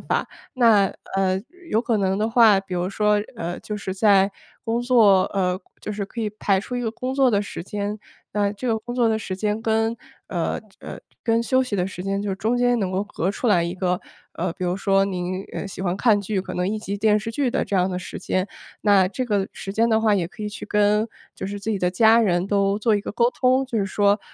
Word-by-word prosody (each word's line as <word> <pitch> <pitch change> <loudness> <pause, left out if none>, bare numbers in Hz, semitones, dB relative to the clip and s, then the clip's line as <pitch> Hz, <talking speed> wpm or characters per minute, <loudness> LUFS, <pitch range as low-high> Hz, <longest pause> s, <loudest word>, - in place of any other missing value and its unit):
法。 - - -1 0.3
那， 225 -6 +5 0.3
呃， 190 0 +1 0.3
有 220 - +3
可 235 -3 +1
能 190 -1 +1
的 215 +2 0
话， 220 -5 +6
比 195 -2 -7
如 175 +1 -1
说， 210 +1 +2 0.2
呃， 175 -5 -4
就 210 - -5
是 195 -2 -4
在 195 0 +4 0.3
工 230 +1 0
作 220 -7 +5
呃， 185 -1 0 0.2
就 - - -5
是 200 -1 -3
可 230 - -7
以 215 -2 -1
排 200 -2 +1
出 250 +4 -5
一 245 - -1
个 225 -2 -1
工 255 +3 -4
作 270 -2 +4
的 205 -1 +2
时 205 - -7
间， 205 +1 -4 0.3
那 205 -1 +1
这 240 +4 -4
个 220 -1 +1
工 240 +2 -7
作 240 -2 +3
的 220 0 +1
时 190 -3 -4
间 210 +2 -1
跟 225 +1 +1 0.3
呃， - - -2 0.2
呃， - - -8 0.2
跟 230 0 +2
休 260 +2 +2
息 250 -5 -4
的 180 -1 0
时 185 -2 -7
间 195 +1 -1
就 205 - -3
是 190 - -2
中 225 +4 0
间 245 -1 +3
能 190 -3 -1
够 190 +2 0
隔 195 -3 -2 0.3
一 170 +1 -2
个 180 -1 0 0.3
呃， 170 0 -2
比 185 - -9
如 180 +1 0
说 195 0 +2
您， 185 0 -3
呃， - - -4
喜 190 - -8
欢 185 -1 -1
看 215 -2 +3
剧， 200 0 -2
可 - - -7
能 180 +1 -1
1 215 +1 -2
集 200 -1 -4
电 215 0 +3
视 225 +2 -5
剧 260 +2 0
的 270 - 0
这 200 - -4
样 185 0 +3
的 180 -1 -3
时 185 - -7
间， 185 +1 -1 0.4
那 195 -3 +5
这 255 +6 -3
个 205 -4 0
时 195 - -6
间 230 +2 +2
的 220 -1 +3
话 215 -2 +3
也 175 -3 0
可 215 - -10
以 210 - -2
去 205 - -8
跟 210 +1 +2 0.3
就 - - -5
是 205 +1 -5
自 210 +3 -3
己 205 - 0
的 180 -1 +1
家 225 +4 +5
人 180 -4 +1
都 200 0 +1
做 220 +1 +2
一 205 - +1
个 - - -6
沟 235 +3 +2
通， 260 +1 +2
就 235 -4 -2
是 195 - 0
说， 205 +1 +2
205 Hz, 265 characters per minute, -23 LUFS, 190-225 Hz, 0.4 s, 话